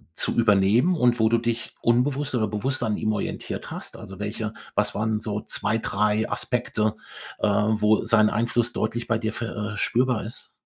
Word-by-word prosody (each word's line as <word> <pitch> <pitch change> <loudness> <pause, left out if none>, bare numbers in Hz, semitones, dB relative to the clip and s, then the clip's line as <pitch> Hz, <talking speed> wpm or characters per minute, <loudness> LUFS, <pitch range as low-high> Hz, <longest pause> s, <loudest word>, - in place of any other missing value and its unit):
zu - - 0
übernehmen 115 - +4
und 125 -5 +3
wo 110 0 +4
du 115 0 +3
dich 115 0 -3
unbewusst 130 +3 +1
oder 110 -2 +1
bewusst 125 +6 -2
an 110 -2 0
ihm 110 - 0
orientiert 105 - -4
hast? - - -7
Also 95 0 -10
welche 105 +1 -3 0.2
was - - +1
waren 110 0 0
so 105 -1 -3
2, 110 - -1
3 105 +1 0
Aspekte, 110 -3 -1 0.4
äh, - - +2
wo 105 +1 +3
sein 110 -2 +4
Einfluss 120 +1 0
deutlich 115 +2 -2
bei 115 - +2
dir 110 -1 -3
ver 105 -2 -4
äh, - - -7
spürbar 125 -2 +1
ist? 110 - -7
110 Hz, 180 wpm, -25 LUFS, 105-120 Hz, 0.4 s, übernehmen